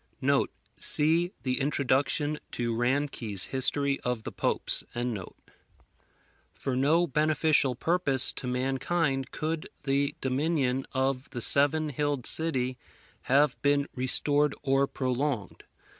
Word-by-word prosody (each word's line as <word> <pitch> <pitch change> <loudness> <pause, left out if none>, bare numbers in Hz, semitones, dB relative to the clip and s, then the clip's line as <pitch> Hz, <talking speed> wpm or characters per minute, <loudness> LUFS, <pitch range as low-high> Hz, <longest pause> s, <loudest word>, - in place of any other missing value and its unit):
[See 165 +4 +5
the 130 0 -1
Introduction 145 +2 0
to 120 -1 -2
Ranke's 120 -5 -1
History 140 +1 0
of 125 -3 -3
the - - -6
Popes.] - - 0 1.7
For 135 -2 -3
no 155 +7 +3
beneficial 155 -3 +2
purpose 145 -3 +1
to 125 - -6
mankind 135 +2 -1
could 155 0 -4
the 140 0 0
dominion 135 -1 -1
of 130 0 -1
the 120 - -6
seven 150 +2 +3
hilled 145 -2 -2
city 130 -6 +1 0.5
have 140 +1 +3
been 145 0 +2
restored 145 +3 +2
or 135 0 +2
prolonged. 130 -4 -3
140 Hz, 105 wpm, -28 LUFS, 130-150 Hz, 1.7 s, See